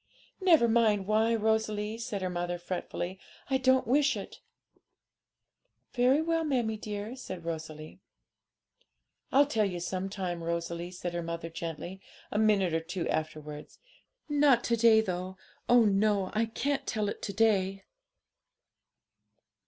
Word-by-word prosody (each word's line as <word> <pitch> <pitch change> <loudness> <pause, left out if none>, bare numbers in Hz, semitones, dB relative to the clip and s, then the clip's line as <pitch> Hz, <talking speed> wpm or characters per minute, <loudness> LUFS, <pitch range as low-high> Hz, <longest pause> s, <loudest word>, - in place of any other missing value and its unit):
'Never 330 -10 +5
mind 220 -4 +3
why, 220 +3 +2
Rosalie,' 220 0 0
said 220 -5 -4
her 185 - -1
mother 175 0 -2
fretfully; 180 +1 -5 0.3
'I 265 - +4
don't 260 0 +3
wish 275 -1 +3
it.' 200 - -8 1.5
'Very 255 +5 +3
well, 330 0 +1
mammie 245 -7 0
dear,' 210 +2 -5
said 185 -9 -8
Rosalie. 155 -2 -6 1.3
'I'll 280 +2 +6
tell 225 -7 +1
you 180 -2 -4
some 185 +2 -3
time, 180 -4 -4
Rosalie,' 170 +1 -3
said 180 -1 -5
her 175 - -2
mother 170 0 -5
gently, 170 +3 -6 0.3
a 210 - 0
minute 205 -5 +3
or 165 - +2
two 165 +2 -4
afterwards; 155 -1 -4 0.5
'not 290 -5 +4
to 235 - +1
day, 225 -1 +6
though; 185 -2 -4 0.3
oh 240 -1 +6
no! 200 -1 +2
I 225 +1 +1
can't 275 +5 -2
tell 215 -2 -1
it 205 - -5
to 200 - -4
day.' 195 -2 +2
205 Hz, 135 wpm, -30 LUFS, 175-230 Hz, 1.5 s, I'll